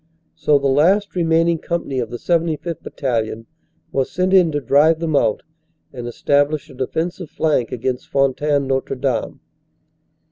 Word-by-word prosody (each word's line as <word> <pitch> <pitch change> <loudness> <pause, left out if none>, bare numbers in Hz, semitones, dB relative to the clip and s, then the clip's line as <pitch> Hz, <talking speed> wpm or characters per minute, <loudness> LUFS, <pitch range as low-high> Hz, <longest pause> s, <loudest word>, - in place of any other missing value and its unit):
So 150 - +2
the 140 - -4
last 180 +10 +3
remaining 165 -1 +2
company 160 -7 -3
of 115 -3 -3
the 120 - -5
75th. 165 +1 -1
Bat - - -11
talion 115 -4 -2 0.5
was 135 -1 0
sent 185 +1 0
in 180 -4 +5
to 145 - -1
drive 150 +4 +4
them 165 -2 -1
out 115 -6 +1 0.5
and 120 -2 -6
establish 145 +4 0
a - - -13
defensive 160 +6 -3
flank 150 -7 0
against 125 +1 -3
Fontaine 140 +1 +1
Notre 135 0 -1
Dame. 130 -2 -2
145 Hz, 150 wpm, -20 LUFS, 130-165 Hz, 0.5 s, in